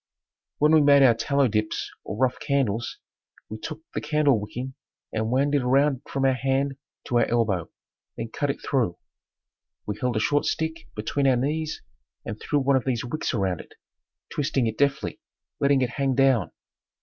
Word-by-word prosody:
When 150 +1 +4
we 160 -1 +6
made 140 -1 +6
our 125 -3 +7
tallow 135 +4 +1
dips 110 -1 -1
or - - -6
rough 130 +1 +1
candles, 125 -6 -1 0.5
we 110 - -6
took 155 +4 -7
the - - -2
candlewicking 130 -5 0 0.4
and 110 0 -1
wound 140 +4 +2
it 145 - +3
around 135 +1 +2
from 135 -1 0
our 135 - +4
hand 135 +2 0 0.3
to 120 - +2
our 115 - +4
elbow, 105 -8 0 0.5
then 115 0 -4
cut 145 +5 -2
it 140 - -2
through. 120 - +1 0.9
We 105 -1 -4
held 125 -2 0
a - - +2
short 145 +6 +1
stick 160 0 -2
between 135 +6 0
our 130 - +5
knees 155 +5 -2 0.4
and 105 - -5
threw 145 - 0
one 140 -1 +3
of 130 - -3
these 125 -2 -1
wicks 155 +6 -2
around 95 - -1
it, - - -18 0.6
twisting 135 -3 0
it 110 -1 -1
deftly, 140 -1 0 0.4
letting 140 -1 +3
it 125 - -1
hang 135 +2 0
down. 135 -6 +3
130 Hz, 175 wpm, -25 LUFS, 115-140 Hz, 0.9 s, our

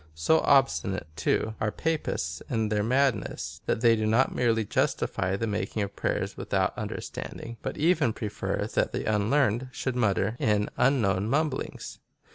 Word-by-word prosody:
So 120 - +3
obstinate, 135 -8 +2
too, 110 +7 0
are 110 - +1
Papists 105 - -2
in 110 -3 0
their 105 -1 +1
madness, 125 0 0
that - - 0
they 115 -1 +5
do 110 -1 -1
not 115 +5 +3
merely 115 -3 +1
justify 95 -1 0
the 115 - -2
making 105 0 -2
of 100 0 -6
prayers - - -2
without - - 0
under - - -4
standing, 115 0 -7
but - - -4
even 155 -6 +3
prefer 105 -1 -3
that - - +1
the - - -2
unlearned 115 +3 +1
should 130 -1 -3
mutter 110 -1 +1
in 105 -1 +1
unknown 105 -7 +2
mumblings. 150 0 -2
110 Hz, 155 wpm, -27 LUFS, 105-130 Hz, -, they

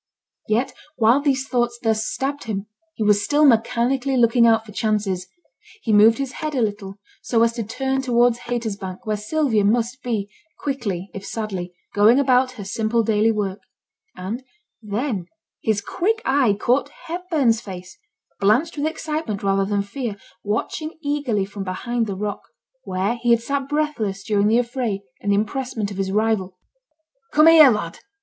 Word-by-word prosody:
Yet 225 +5 0 0.2
while 235 +4 +4
these 275 -2 0
thoughts 240 -2 0
thus 220 -1 +1
stabbed 280 +1 -3
him, 205 -3 -3 0.3
he 220 - -2
was 205 -1 +3
still 295 +6 +3
mechanically 245 +2 +2
looking 235 0 +5
out 225 -1 +3
for 210 - -11
chances. 200 -4 -1 0.6
He 220 - +1
moved 215 +2 +6
his 275 -2 -3
head 305 +2 -4
a 255 - +1
little, 205 -2 -4 0.2
so 230 -2 +2
as 230 0 +2
to 230 -1 -3
turn 265 +5 -2
towards 240 -2 +3
Haytersbank, 220 -4 -4
where 215 -1 0
Sylvia 220 0 +1
must 235 +5 +1
be 220 -5 -2 0.3
quickly, 205 -10 -3
if 195 - -7
sadly, 190 -6 -5 0.2
going 215 +6 +5
about 255 -2 +3
her 220 -5 -8
simple 220 +3 0
daily 220 +1 +3
work; 205 -2 -2 0.6
and 215 +8 -5 0.4
then 210 -3 -3 0.3
his 215 -2 0
quick 435 - -1
eye 265 -6 +3
caught 250 +3 +1 0.2
Hepburn's 320 - 0
face, 185 -3 -9 0.4
blanched 240 +12 +2
with 295 - +1
excitement 305 -9 -3
rather 195 0 +2
than 200 0 0
fear, 215 0 -5 0.3
watching 270 +10 -3
eagerly 285 -9 0
from 200 0 -7
behind 230 +5 -2
the 200 - -3
rock, 205 +1 -3 0.4
where 195 +6 -1
he 240 - 0
had 235 -1 +4
sat 275 +1 -2
breathless 275 -11 -1
during 205 -1 +2
the 225 +2 +4
affray 235 -4 -1 0.2
and 205 - -3
the - - +4
impressment 220 0 -2
of 195 - -7
his 195 -1 -1
rival. 205 -3 0 0.8
'Come 305 +1 +6
here, 320 -3 +9
lad!' 210 -8 -2
225 Hz, 165 wpm, -22 LUFS, 205-260 Hz, 0.8 s, here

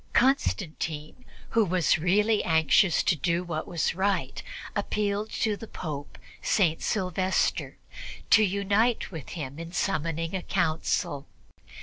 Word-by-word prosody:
Constantine, 180 - 0 0.2
who 225 - +3
was 180 -3 +2
really 205 +6 +2
anxious 160 +2 +4
to 175 - +3
do 170 +4 0
what 160 -3 -4
was 170 -3 0
right, 190 -7 -1 0.3
appealed 205 0 -1
to 215 -2 0
the 225 - -9
Pope, 145 -7 -6 0.2
St. 165 -6 +2
Sylvester, 185 -2 0 0.5
to 215 - +7
unite 200 +4 +1
with 160 -7 -8
him 140 -1 -6
in 165 0 -7
summoning 165 -3 -1
a 190 - -1
Council. 160 -5 -1
180 Hz, 120 wpm, -27 LUFS, 160-205 Hz, 0.5 s, to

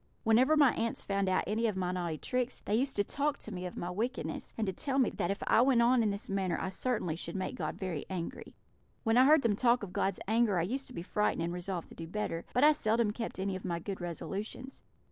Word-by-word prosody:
Whenever 255 +8 +4
my 285 -4 +6
aunts 230 0 -2
found 195 -1 0
out 185 - +2
any 220 +3 0
of 210 -3 -2
my 180 -1 0
naughty 175 -3 -2
tricks, 250 - -2
they - - -1
used 265 +5 +1
to 205 - +2
talk 285 +6 -1
to 220 - -9
me 180 -2 -4
of 180 - -9
my 175 - -3
wickedness, 235 +8 -3
and 220 - 0
to 190 - -2
tell 270 +7 -1
me 260 -4 +3
that 175 - -2
if 200 - -2
I - - +5
went 250 -2 +4
on 245 +1 +4
in 220 - +2
this 200 0 -4
manner 190 -3 0
I - - -2
certainly 190 -4 -1
should 170 - -4
make 190 +4 -2
God - - -3
very 180 -6 -4
angry. 180 -3 -5 0.5
When 225 -1 +2
I 255 +1 +7
heard 305 +1 +6
them 220 -3 +3
talk 240 +1 +3
of 185 - -7
God's 195 -1 0
anger 220 -3 +3
I 165 - +2
used 265 +9 -3
to 255 - -9
be 170 - -5
frightened, 210 -3 0
and 170 +1 -2
resolved 180 -1 -4
to - - -12
do 165 - -7
better; 170 -3 -3
but 250 - +2
I 300 - +8
seldom 225 -5 +1
kept 230 +2 -5
any 190 0 -2
of 185 - -6
my 175 -3 -2
good 190 +2 -5
resolutions. 200 +9 -5
210 Hz, 260 wpm, -32 LUFS, 185-245 Hz, 0.5 s, I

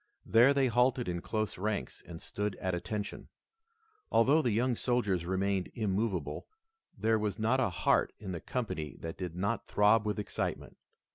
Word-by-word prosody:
There 120 +5 +6
they 140 -1 +3
halted 125 +1 +2
in 85 -1 -2
close 110 -2 -2
ranks 105 +1 -3
and 85 -2 -8
stood 105 +1 -3
at 95 0 -2
attention. 105 +4 -4 0.8
Although 140 +8 +5
the 125 - +1
young 120 +3 +1
soldiers 105 -9 0
remained 95 0 0
immovable, 100 -6 -1 0.5
there 110 0 +2
was 105 -2 -2
not 115 +4 +2
a 125 - +2
heart 90 - +2
in 95 -3 -7
the 85 - -5
company 95 - -3
that 80 0 -5
did 90 -3 -5
not 100 +6 -2
throb 105 +1 +4
with 105 - -1
excitement. 105 - -4
105 Hz, 160 wpm, -31 LUFS, 95-115 Hz, 0.8 s, There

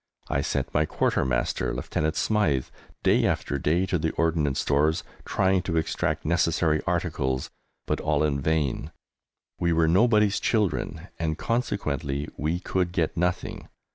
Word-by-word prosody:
I - - +1
sent - - -2
my 75 +1 +2
Quartermaster, - - 0
Lieutenant 80 +1 -1
Smythe, 80 -13 +1 0.4
day - - +4
after 70 - -1
day, 85 +7 +2
to 90 -2 0
the 80 - 0
Ordnance 80 -4 +1
Stores 75 +3 +2 0.2
trying 95 -1 +2
to 85 -2 -2
extract 80 0 -1
necessary 85 -1 +2
articles, 65 0 -1 0.3
but - - -1
all 75 -1 +1
in 70 -2 +1
vain! 75 -2 0 0.7
We 85 -1 +2
were 80 0 +3
nobody's 105 +3 +4
children, 105 -5 -1
and 80 -1 -1
consequently 75 - -1
we 80 +4 -1
could 90 -1 -1
get 85 -4 0
nothing. 90 +1 -2
80 Hz, 140 wpm, -26 LUFS, 75-90 Hz, 0.7 s, day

